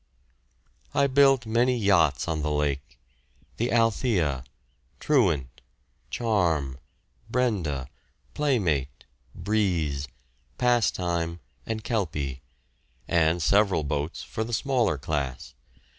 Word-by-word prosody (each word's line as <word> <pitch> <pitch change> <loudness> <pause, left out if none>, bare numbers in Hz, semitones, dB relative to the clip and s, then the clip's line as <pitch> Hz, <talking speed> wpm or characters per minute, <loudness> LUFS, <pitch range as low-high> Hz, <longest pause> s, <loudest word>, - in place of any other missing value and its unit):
I 140 - +4
built 135 -2 +4
many 120 +3 +2
yachts 90 - +3
on 80 -2 -1
the 75 - -1
lake 75 -2 -2 0.6
the 120 +2 0
"Althea," 105 - +1 0.6
"Truant," 80 - +1 0.5
"Charm," 85 - 0 0.5
"Brenda," 90 - 0 0.5
"Playmate," 85 - 0 0.3
"Breeze," 85 -8 0 0.5
"Pastime," 90 -8 +1 0.3
and 110 -1 -3
"Kelpie" 75 - -2 0.7
and 85 0 +2
several 100 -5 +3
boats 75 +2 -3
for 110 - -4
the 120 +2 -6
smaller 120 - +1
class. 70 -3 -3
85 Hz, 90 wpm, -26 LUFS, 75-115 Hz, 0.7 s, I